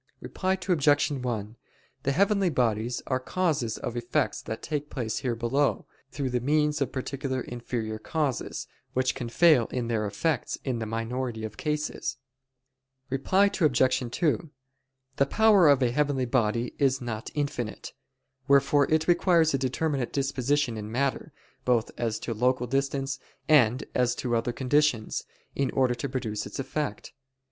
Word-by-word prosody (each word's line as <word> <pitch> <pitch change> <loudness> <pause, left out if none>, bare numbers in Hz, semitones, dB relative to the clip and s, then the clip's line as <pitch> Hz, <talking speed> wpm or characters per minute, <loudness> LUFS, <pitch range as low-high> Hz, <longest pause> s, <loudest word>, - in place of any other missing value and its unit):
Reply 185 0 -1
Obj. 145 -5 +3
1: 120 -5 -3 0.5
The 140 - 0
heavenly 200 +3 +3
bodies 120 -4 0
are 130 -1 0
causes 145 - -1
of 120 - -5
effects 120 0 -1
that 110 - -6
take 150 -1 -3
place 115 -5 -3
here 125 -3 -1
below, 130 +5 0 0.2
through 135 -2 -3
the 125 - +1
means 150 +3 +1
of 135 - 0
particular 130 0 -3
inferior 115 -3 -4
causes, 145 0 -2 0.3
which 130 0 +1
can 125 -3 -5
fail 140 -2 +5
in 120 -2 -3
their 110 -2 0
effects 125 +7 -1
in 125 -4 -1
the 110 - -3
minority 115 +1 -3
of 105 -1 -7
cases. 150 0 -2 0.9
Reply 190 +9 +3
Obj. 130 -4 +3
2: 165 +3 0 0.7
The 140 - +4
power 210 -2 +5
of 140 -2 +5
a 120 - +2
heavenly 140 -1 +1
body 120 -1 0
is 135 -2 +3
not 115 -3 -5
infinite. 140 -6 -3 0.5
Wherefore 140 +1 +4
it 155 0 +2
requires 170 -2 +4
a 135 - +1
determinate 135 0 -1
disposition 135 -2 0
in 105 0 -6
matter, 140 +5 -1 0.3
both 120 -3 +1
as 115 -2 -1
to 115 - -3
local 125 +2 +1
distance 135 +1 -1 0.3
and 130 -5 +4
as 125 -1 +2
to 120 -2 -1
other 115 +1 0
conditions, 130 -2 +1 0.3
in 140 -1 0
order 130 -2 +2
to 135 +3 -4
produce 110 -5 -3
its - - -8
effect. 135 -3 -4
130 Hz, 150 wpm, -27 LUFS, 120-145 Hz, 0.9 s, fail